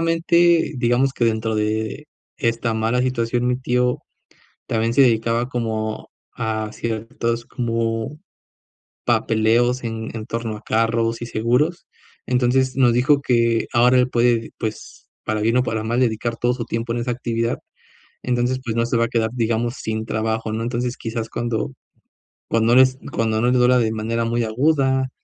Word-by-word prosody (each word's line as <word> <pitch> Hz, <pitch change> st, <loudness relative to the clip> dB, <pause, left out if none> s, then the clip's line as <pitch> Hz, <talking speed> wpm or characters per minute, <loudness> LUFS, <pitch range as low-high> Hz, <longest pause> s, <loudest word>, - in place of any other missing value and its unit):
afortunadamente, 165 Hz, 0 st, +3 dB
digamos 125 Hz, +2 st, +2 dB
que 120 Hz, -, 0 dB
dentro 110 Hz, -1 st, 0 dB
de 110 Hz, +6 st, -2 dB, 0.3 s
esta 115 Hz, -1 st, 0 dB
mala 115 Hz, +3 st, +1 dB
situación, 125 Hz, -1 st, 0 dB
mi 125 Hz, 0 st, +1 dB
tío 125 Hz, 0 st, +1 dB, 0.7 s
también 115 Hz, +1 st, 0 dB
se 135 Hz, -, +6 dB
dedicaba 115 Hz, 0 st, +2 dB
como 110 Hz, -3 st, -3 dB, 0.2 s
a 110 Hz, -1 st, -3 dB
ciertos 115 Hz, +1 st, -3 dB
como 115 Hz, +2 st, -2 dB, 0.9 s
papeleos 120 Hz, +3 st, +2 dB
en 115 Hz, -1 st, -4 dB
en 110 Hz, -, -5 dB
torno 115 Hz, -2 st, -4 dB
a 105 Hz, -, -12 dB
carros 115 Hz, 0 st, 0 dB
y 120 Hz, -, -4 dB
seguros, 125 Hz, +10 st, 0 dB, 0.4 s
entonces 130 Hz, +1 st, +1 dB
nos 125 Hz, -3 st, +4 dB
dijo 140 Hz, +4 st, +3 dB
que 115 Hz, -3 st, +2 dB
ahora 125 Hz, +2 st, +4 dB
él 125 Hz, 0 st, +3 dB
puede, 120 Hz, -1 st, +2 dB
pues 110 Hz, -2 st, -6 dB, 0.2 s
para 110 Hz, 0 st, -1 dB
bien 115 Hz, +3 st, +2 dB
o 125 Hz, -, +4 dB
para 110 Hz, -3 st, -2 dB
mal 115 Hz, +3 st, -1 dB
dedicar 115 Hz, -1 st, 0 dB
todo 120 Hz, +1 st, +1 dB
su 120 Hz, -2 st, -4 dB
tiempo 115 Hz, +1 st, -3 dB
en 120 Hz, -, -2 dB
esa 120 Hz, +1 st, -2 dB
actividad, 115 Hz, -1 st, -2 dB, 0.6 s
entonces 125 Hz, +1 st, 0 dB
pues 115 Hz, -3 st, -3 dB
no 115 Hz, 0 st, +1 dB
se 120 Hz, 0 st, 0 dB
va 115 Hz, -, +3 dB
a -, -, -3 dB
quedar, 115 Hz, -2 st, 0 dB
digamos, 120 Hz, 0 st, 0 dB
sin 110 Hz, 0 st, -3 dB
trabajo, 110 Hz, 0 st, -2 dB
¿no?, 110 Hz, -, -2 dB
entonces 120 Hz, +1 st, -2 dB
quizás 115 Hz, 0 st, -4 dB
cuando 120 Hz, +3 st, -2 dB, 0.7 s
cuando 115 Hz, +1 st, +2 dB
no 130 Hz, -, +9 dB
es 130 Hz, 0 st, +3 dB
cuando 110 Hz, -1 st, 0 dB
no 120 Hz, -, +2 dB
le 125 Hz, -, +3 dB
duela 125 Hz, +1 st, +5 dB
de 110 Hz, -2 st, +1 dB
manera 115 Hz, +1 st, -2 dB
muy 115 Hz, +1 st, 0 dB
aguda 130 Hz, +2 st, +1 dB
115 Hz, 165 wpm, -21 LUFS, 115-125 Hz, 0.9 s, no